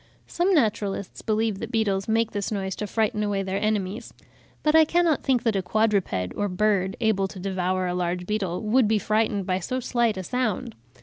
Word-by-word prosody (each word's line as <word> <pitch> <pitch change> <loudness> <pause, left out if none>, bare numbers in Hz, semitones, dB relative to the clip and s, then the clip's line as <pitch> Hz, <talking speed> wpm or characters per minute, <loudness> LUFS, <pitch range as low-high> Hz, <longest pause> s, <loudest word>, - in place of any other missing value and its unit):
Some 355 +3 0
naturalists 205 - -1
believe 215 -2 0
that 230 +2 -6
beetles 200 -5 0
make 225 0 +1
this 205 0 -3
noise 190 -2 -2
to 210 - -3
frighten 215 0 0
away 205 -2 0
their 190 +1 -2
enemies; 210 0 -2 0.5
but 305 - +3
I 320 0 +8
cannot 335 -1 +2
think 250 -3 +1
that 225 -3 +1
a 195 - +1
quadruped 190 - 0
or 205 - -1
bird, 190 0 +1
able 215 -4 +1
to 190 - -10
devour 185 -1 -1
a 180 - -1
large 180 0 -2
beetle, 190 -3 -2
would 225 +2 +3
be 220 0 +3
frightened 215 -2 0
by 185 0 0
so 255 +8 -3
slight 235 -4 0
a 190 - -4
sound. 235 -1 -2
210 Hz, 195 wpm, -25 LUFS, 190-225 Hz, 0.5 s, I